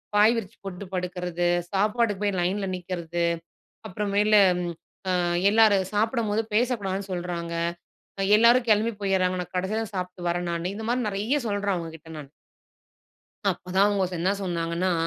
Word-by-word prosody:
பாய் 210 Hz, +3 st, +6 dB
விரிச்சி 195 Hz, -5 st, -6 dB
போட்டு 195 Hz, +1 st, -6 dB
படுக்கிறது. 180 Hz, -1 st, -2 dB, 0.2 s
சாப்பாடுக்கு 210 Hz, +1 st, +1 dB
போய் 200 Hz, -2 st, 0 dB
லைன்ல 195 Hz, +3 st, 0 dB
நிக்கிறது. 175 Hz, -1 st, -3 dB, 0.7 s
அப்புறமேலு 210 Hz, +2 st, +3 dB, 0.2 s
ம் 175 Hz, -1 st, -3 dB, 0.4 s
அ -, -, +2 dB, 0.4 s
எல்லாரும் 205 Hz, -4 st, +4 dB
சாப்பிடம்போது 220 Hz, -1 st, +1 dB
பேசக்கூடாதுன்னு 200 Hz, -5 st, 0 dB
சொல்றாங்க. 175 Hz, -1 st, -4 dB, 0.8 s
எல்லாரும் 235 Hz, +2 st, +5 dB
கிளம்பி 215 Hz, +2 st, +3 dB
போயிர்றாங்க. 185 Hz, -1 st, +1 dB
நான் 175 Hz, -, -17 dB
கடைசில 205 Hz, +5 st, -1 dB
தான் 215 Hz, -2 st, -9 dB
சாப்பிட்டு 180 Hz, -1 st, -4 dB
வரேன் 175 Hz, 0 st, -1 dB
நானு." 175 Hz, +3 st, -2 dB
இந்த 220 Hz, -, -5 dB
மாதிரி 245 Hz, -2 st, 0 dB
நெறைய 215 Hz, +9 st, 0 dB
சொல்றேன் 200 Hz, -1 st, 0 dB
அவங்ககிட்ட 165 Hz, -1 st, -7 dB
நான். 140 Hz, -2 st, -9 dB, 1.2 s
அப்பதான் 185 Hz, +2 st, +1 dB
அவங்க 200 Hz, -2 st, +1 dB
ச -, -, -13 dB
என்ன 185 Hz, -, +2 dB
சொன்னாங்கன்னா, 170 Hz, 0 st, -1 dB
190 Hz, 140 wpm, -26 LUFS, 180-210 Hz, 1.2 s, பாய்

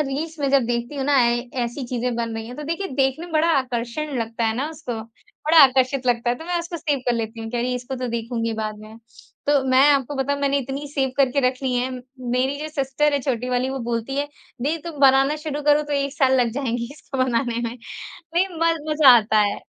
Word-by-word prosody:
Reels 310 Hz, +4 st, -4 dB
मैं 280 Hz, -, +1 dB
जब 275 Hz, -3 st, +4 dB
देखती 240 Hz, +3 st, -2 dB
हूँ 270 Hz, -, -2 dB
ना, 285 Hz, 0 st, +3 dB
ऐ 240 Hz, 0 st, +3 dB, 0.3 s
ऐसी 240 Hz, +3 st, -5 dB
चीज़ें 245 Hz, 0 st, -2 dB
बन 230 Hz, -1 st, -2 dB
रही 225 Hz, 0 st, -5 dB
हैं, 245 Hz, -, -9 dB
तो 300 Hz, -, -6 dB
देखिए, 335 Hz, +6 st, -3 dB
देखने 270 Hz, +5 st, 0 dB
में 345 Hz, -, -12 dB
बड़ा 315 Hz, +1 st, +3 dB
आकर्षण 255 Hz, +3 st, -3 dB
लगता 230 Hz, 0 st, -2 dB
है 220 Hz, -, +1 dB
ना 275 Hz, +5 st, -1 dB
उसको, 285 Hz, -8 st, -6 dB, 0.4 s
बड़ा 320 Hz, +2 st, +5 dB
आकर्षित 260 Hz, 0 st, +1 dB
लगता 240 Hz, 0 st, +2 dB
है। 245 Hz, -, -1 dB
तो 320 Hz, -, -9 dB
मैं 350 Hz, 0 st, -1 dB
उसको 340 Hz, 0 st, -5 dB
सेव 300 Hz, -3 st, -1 dB
कर 245 Hz, -, +3 dB
लेती 225 Hz, 0 st, -4 dB
हूँ 225 Hz, 0 st, -6 dB
कि, 245 Hz, -, -3 dB
"अरे! 245 Hz, +1 st, -1 dB
इसको 250 Hz, +2 st, -5 dB
तो 250 Hz, 0 st, -3 dB
देखूँगी 230 Hz, 0 st, -2 dB
बाद 215 Hz, -1 st, -4 dB
में।" 215 Hz, +1 st, -12 dB, 0.5 s
तो 285 Hz, -1 st, +3 dB
मैं 260 Hz, +2 st, +6 dB
आपको 280 Hz, -1 st, +1 dB
बताऊँ, 280 Hz, +1 st, -1 dB
मैंने 280 Hz, 0 st, +2 dB
इतनी 275 Hz, +2 st, -5 dB
सेव 265 Hz, -2 st, +1 dB
करके 275 Hz, 0 st, +3 dB
रख 255 Hz, -, -3 dB
ली 260 Hz, -2 st, 0 dB
हैं, 250 Hz, +1 st, 0 dB, 0.4 s
मेरी 260 Hz, +3 st, +1 dB
जो 310 Hz, -, -4 dB
सिस्टर 295 Hz, 0 st, 0 dB
है 285 Hz, -, +2 dB
छोटी 250 Hz, -2 st, -2 dB
वाली, 250 Hz, +1 st, 0 dB
वो 270 Hz, -, -3 dB
बोलती 235 Hz, +3 st, -2 dB
है, 285 Hz, +1 st, 0 dB, 0.4 s
"दीदी, 300 Hz, +5 st, 0 dB
तुम 315 Hz, -3 st, -8 dB
बनाना 270 Hz, +2 st, +5 dB
शुरू 300 Hz, -1 st, -4 dB
करो, 295 Hz, +1 st, +4 dB
तो 295 Hz, 0 st, -6 dB
1 280 Hz, -1 st, 0 dB
साल 265 Hz, -3 st, +3 dB
लग 235 Hz, -, +1 dB
जाएँगे 240 Hz, -2 st, -2 dB
इसको 275 Hz, -2 st, -8 dB
बनाने 240 Hz, -1 st, -1 dB
में।" 235 Hz, 0 st, -3 dB, 0.6 s
नहीं, 360 Hz, +3 st, +3 dB
म 330 Hz, -2 st, +1 dB, 0.2 s
मज़ा 295 Hz, -5 st, +8 dB
आता 215 Hz, -1 st, +2 dB
है। 205 Hz, -1 st, 0 dB
265 Hz, 235 wpm, -22 LUFS, 240-290 Hz, 0.6 s, मज़ा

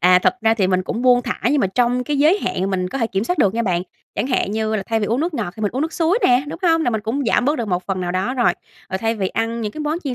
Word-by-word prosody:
À, 180 Hz, +1 st, +6 dB
thật -, -, +3 dB
ra 225 Hz, 0 st, +3 dB
thì 195 Hz, -4 st, +1 dB
mình 185 Hz, 0 st, +1 dB
cũng 230 Hz, +6 st, -4 dB
buông 245 Hz, -1 st, +5 dB
thả -, -, -4 dB
nhưng 285 Hz, -1 st, +2 dB
mà -, -, +2 dB
trong 245 Hz, +5 st, +1 dB
cái 290 Hz, +1 st, -1 dB
giới 315 Hz, +8 st, +4 dB
hạn 195 Hz, -, -2 dB
mình 185 Hz, -1 st, -1 dB
có 270 Hz, -, -4 dB
thể 230 Hz, -, +1 dB
kiểm 195 Hz, 0 st, -2 dB
soát 360 Hz, +4 st, -1 dB
được 205 Hz, -6 st, +3 dB
nha 235 Hz, -, 0 dB
bạn, 180 Hz, -4 st, 0 dB, 0.3 s
chẳng 210 Hz, +5 st, -1 dB
hạn 255 Hz, -6 st, 0 dB
như 220 Hz, 0 st, -1 dB
là 195 Hz, -, -2 dB
thay 225 Hz, -1 st, 0 dB
vì 205 Hz, -, 0 dB
uống 235 Hz, +5 st, 0 dB
nước 335 Hz, 0 st, -1 dB
ngọt 200 Hz, -8 st, -3 dB
thì 215 Hz, -, -7 dB
mình 205 Hz, -, +1 dB
uống 265 Hz, +4 st, -1 dB
nước 320 Hz, -, -2 dB
suối 345 Hz, +6 st, +2 dB
nè, 250 Hz, +1 st, +4 dB
đúng 330 Hz, -, -6 dB
hông? 330 Hz, -2 st, +3 dB
Là 245 Hz, -, +1 dB
mình 220 Hz, -, -1 dB
cũng 235 Hz, +6 st, -2 dB
giảm 240 Hz, -, +2 dB
bớt 295 Hz, +4 st, +1 dB
được 230 Hz, -4 st, -3 dB
một 180 Hz, 0 st, 0 dB
phần 190 Hz, -2 st, -2 dB
nào 175 Hz, -1 st, -2 dB
đó 195 Hz, +8 st, -1 dB
rồi, 240 Hz, -2 st, +3 dB, 0.4 s
rồi 190 Hz, -, -1 dB
thay 225 Hz, +1 st, 0 dB
vì 190 Hz, -3 st, -1 dB
ăn 230 Hz, +1 st, -2 dB
những 210 Hz, -2 st, -3 dB
cái 310 Hz, -, -7 dB
món 305 Hz, +3 st, -1 dB
chiên 260 Hz, -3 st, -2 dB
230 Hz, 345 wpm, -20 LUFS, 195-270 Hz, 0.4 s, À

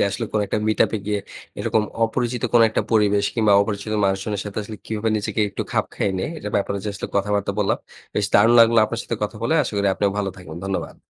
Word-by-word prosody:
যে, -, -, +4 dB
আসলে 100 Hz, -, -3 dB
কোন 105 Hz, -, +1 dB
একটা -, -, -1 dB
meet 110 Hz, -, 0 dB
up -, -, -4 dB
এ -, -, -3 dB
গিয়ে 105 Hz, -1 st, 0 dB, 0.4 s
এরকম 110 Hz, -, +1 dB, 0.2 s
অপরিচিত 120 Hz, +1 st, -2 dB
কোন 120 Hz, -, +6 dB
একটা -, -, 0 dB
পরিবেশ 105 Hz, -2 st, +3 dB
কিংবা 110 Hz, -3 st, +3 dB
অপরিচিত 100 Hz, +1 st, -2 dB
মানুষজনের 95 Hz, +1 st, -1 dB
সাথে 105 Hz, 0 st, -5 dB
আসলে 105 Hz, +1 st, -8 dB
কিভাবে 110 Hz, 0 st, -1 dB
নিজেকে 110 Hz, +1 st, -2 dB
একটু -, -, -3 dB
খাপ -, -, +2 dB
খাইয়ে 100 Hz, -, 0 dB
নেই, -, -, -2 dB
এটার 105 Hz, -8 st, -6 dB
ব্যাপারে 100 Hz, 0 st, -1 dB
যে -, -, -2 dB
আসলে -, -, -5 dB
কথাবার্তা 100 Hz, 0 st, 0 dB
বললাম, 100 Hz, -2 st, +1 dB, 0.4 s
বেশ 105 Hz, -, +1 dB
দারুণ 115 Hz, +3 st, +6 dB
লাগলো 115 Hz, 0 st, +6 dB
আপনার 115 Hz, +2 st, -3 dB
সাথে 115 Hz, -, -3 dB
কথা 105 Hz, +1 st, -2 dB
বলে। 145 Hz, +8 st, +1 dB
আশা 120 Hz, -, -4 dB
করি 100 Hz, 0 st, +2 dB
আপনিও 100 Hz, 0 st, +1 dB
ভালো 100 Hz, -1 st, -1 dB
থাকবেন, 90 Hz, -3 st, -10 dB
ধন্যবাদ। 95 Hz, -1 st, -3 dB
105 Hz, 235 wpm, -22 LUFS, 100-110 Hz, 0.4 s, কোন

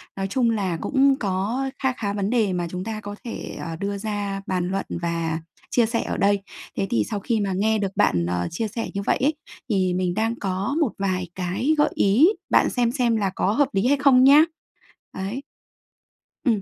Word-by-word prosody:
Nói 195 Hz, 0 st, -2 dB
chung 235 Hz, +3 st, +1 dB
là 195 Hz, -6 st, 0 dB
cũng 275 Hz, -1 st, +3 dB
có 210 Hz, +7 st, -1 dB
kha 265 Hz, -1 st, +2 dB
khá 205 Hz, -5 st, -3 dB
vấn 200 Hz, 0 st, -1 dB
đề 220 Hz, -6 st, +2 dB
mà 175 Hz, -1 st, -1 dB
chúng 180 Hz, +1 st, -4 dB
ta 220 Hz, +1 st, -5 dB
có 205 Hz, -1 st, -7 dB
thể, 235 Hz, -, -6 dB
ờ, 165 Hz, -1 st, -5 dB
đưa 200 Hz, +4 st, -3 dB
ra 200 Hz, -2 st, -3 dB
bàn 180 Hz, -1 st, -1 dB
luận 195 Hz, +1 st, -2 dB, 0.2 s
và 165 Hz, -1 st, -1 dB, 0.3 s
chia 240 Hz, -2 st, +3 dB
sẻ 230 Hz, +1 st, -1 dB
ở -, -, -3 dB
đây. 200 Hz, 0 st, +2 dB, 0.4 s
Thế 195 Hz, -, 0 dB
thì 110 Hz, -2 st, +2 dB
sau 205 Hz, -, -2 dB
khi 225 Hz, +2 st, 0 dB
mà 195 Hz, -2 st, -1 dB
nghe 220 Hz, +3 st, +2 dB
được 195 Hz, -2 st, -1 dB
bạn, 85 Hz, -1 st, +2 dB
ờ, 90 Hz, 0 st, -1 dB
chia 220 Hz, +6 st, -2 dB
sẻ 225 Hz, +2 st, -4 dB
như 200 Hz, -, -2 dB
vậy -, -, +2 dB
ấy, 290 Hz, +4 st, +3 dB, 0.4 s
thì 185 Hz, -4 st, +1 dB
mình 180 Hz, -1 st, 0 dB
đang 225 Hz, +3 st, 0 dB
có 195 Hz, +7 st, -2 dB
một 270 Hz, -, +2 dB
vài 185 Hz, -2 st, -1 dB
cái 190 Hz, -, 0 dB
gợi 295 Hz, -, +4 dB
ý, 230 Hz, -, +5 dB, 0.2 s
bạn -, -, +4 dB
xem 240 Hz, -2 st, +1 dB
xem 245 Hz, -4 st, +1 dB
là 200 Hz, -3 st, +1 dB
có 195 Hz, -, +1 dB
hợp 285 Hz, +1 st, +3 dB
lý 195 Hz, +5 st, +2 dB
hay 285 Hz, +1 st, +4 dB
không 265 Hz, -2 st, +5 dB
nhá. 285 Hz, +3 st, +8 dB, 0.7 s
Đấy. 200 Hz, +8 st, -3 dB, 1.0 s
Ừm, 225 Hz, -6 st, +2 dB
205 Hz, 215 wpm, -23 LUFS, 190-240 Hz, 1.0 s, nhá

